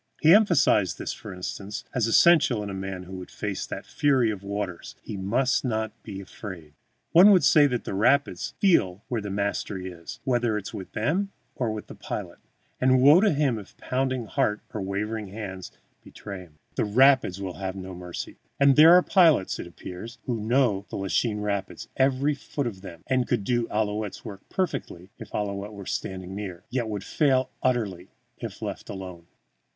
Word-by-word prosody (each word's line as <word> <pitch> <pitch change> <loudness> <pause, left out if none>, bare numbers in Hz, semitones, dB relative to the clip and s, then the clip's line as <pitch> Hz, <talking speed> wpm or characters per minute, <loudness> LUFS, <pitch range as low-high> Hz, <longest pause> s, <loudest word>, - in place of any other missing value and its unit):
He 160 +1 +7
emphasized 165 - +4
this, - - -4
for - - -9
instance, 100 +3 -6
as 120 -4 +1
essential 130 -4 +5
in 100 - -5
a - - -5
man 95 -1 -5
who 95 +1 -8
would 90 - -9
face - - -4
that - - -6
fury 130 -6 +2
of 100 -3 -6
waters, 100 -3 -5
he - - -6
must 115 +7 +1
not 110 -3 -1
be 100 -3 -7
afraid. 90 -5 -9 0.4
One 180 +5 +8
would 190 -4 +6
say 150 -2 +6
that 125 -3 -2
the - - -5
rapids 110 -2 +1
feel 105 - +3
where 120 -3 -1
the 100 - -5
mastery 100 -1 -2
is, 85 -1 -10
whether 120 -5 +1
with 95 - -8
them 175 - 0 0.2
or 120 -4 -1
with 110 -1 -5
the - - -10
pilot, - - -6 0.4
and 130 0 +4
woe 145 +7 +7
to 215 - +4
him 140 -6 +1
if 100 - -14
pounding 130 -2 -1
heart 105 -1 0
or 105 - -3
wavering 105 +2 -3
hand 95 -2 -7 0.3
betray 100 -2 -8
him. 80 -3 -23 0.2
The - - +2
rapids 125 -3 +4
will 95 -2 -5
have 95 -1 -3
no 95 -1 -7
mercy. 90 -1 -7 0.2
And 140 -1 +6
there 160 +3 +9
are 180 - +6
pilots, 165 - +4
it - - -6
appears, 90 +7 -9
who 120 -3 -2
know 110 -4 +1
the - - -6
Lachine 105 +2 0
Rapids, 100 -2 -3
every 135 +2 +2
foot 140 0 -4
of 100 -6 -5
them, 85 -4 -10
and 130 -2 +1
could 100 - 0
do 120 +2 0
Ouillette's 105 -1 -2
work 100 -1 -10
perfectly 100 - -3
if - - -9
Ouillette 100 0 -3
were 100 -1 -9
standing 95 0 -4
near, 95 -4 -6
yet 120 -3 -1
would 100 -3 -4
fail 130 -2 +1
utterly 105 -8 -1 0.3
if - - -7
left - - -5
alone. 90 -4 -8
105 Hz, 185 wpm, -26 LUFS, 95-130 Hz, 0.4 s, there